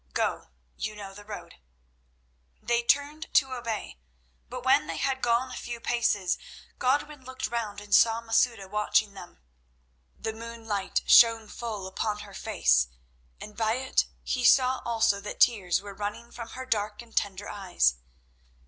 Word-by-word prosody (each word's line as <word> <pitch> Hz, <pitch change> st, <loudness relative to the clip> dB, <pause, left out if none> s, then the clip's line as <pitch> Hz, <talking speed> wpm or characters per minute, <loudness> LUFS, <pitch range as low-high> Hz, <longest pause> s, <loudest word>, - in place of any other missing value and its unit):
Go; -, -, -1 dB, 0.3 s
you 215 Hz, -, -4 dB
know 200 Hz, -2 st, -8 dB
the 205 Hz, +1 st, -11 dB
road." 205 Hz, -, -9 dB, 1.0 s
They 235 Hz, 0 st, +1 dB
turned 285 Hz, +5 st, 0 dB
to 265 Hz, -2 st, +4 dB
obey, 230 Hz, -, -5 dB, 0.5 s
but -, -, -7 dB
when 150 Hz, -, +4 dB
they 165 Hz, -1 st, -4 dB
had 265 Hz, -, -1 dB
gone 240 Hz, +2 st, +1 dB
a -, -, -6 dB
few 240 Hz, -1 st, -6 dB
paces 215 Hz, -6 st, 0 dB, 0.4 s
Godwin 280 Hz, +2 st, 0 dB
looked 260 Hz, 0 st, -5 dB
round 215 Hz, -3 st, -3 dB
and 205 Hz, 0 st, -7 dB
saw 225 Hz, 0 st, +6 dB
Masouda 225 Hz, -2 st, +1 dB
watching 210 Hz, 0 st, +1 dB
them. 175 Hz, -, -12 dB, 0.8 s
The 220 Hz, -, -4 dB
moonlight 225 Hz, -3 st, -3 dB
shone 230 Hz, -2 st, +7 dB
full 215 Hz, -5 st, -5 dB
upon 210 Hz, +2 st, -3 dB
her 200 Hz, -1 st, -11 dB
face, 190 Hz, -, +2 dB, 0.5 s
and 210 Hz, -, -10 dB
by 220 Hz, -1 st, +1 dB
it 260 Hz, +2 st, +1 dB, 0.2 s
he 250 Hz, -, -1 dB
saw 255 Hz, +1 st, +5 dB
also 225 Hz, -4 st, +2 dB
that 205 Hz, -, -7 dB
tears 195 Hz, -7 st, +3 dB
were 200 Hz, 0 st, -9 dB
running 210 Hz, +4 st, -5 dB
from 235 Hz, -1 st, -8 dB
her 260 Hz, -, -5 dB
dark 210 Hz, -2 st, -1 dB
and 230 Hz, -1 st, -20 dB
tender 200 Hz, 0 st, -1 dB
eyes. 180 Hz, -, +1 dB
225 Hz, 155 wpm, -28 LUFS, 205-240 Hz, 1.0 s, shone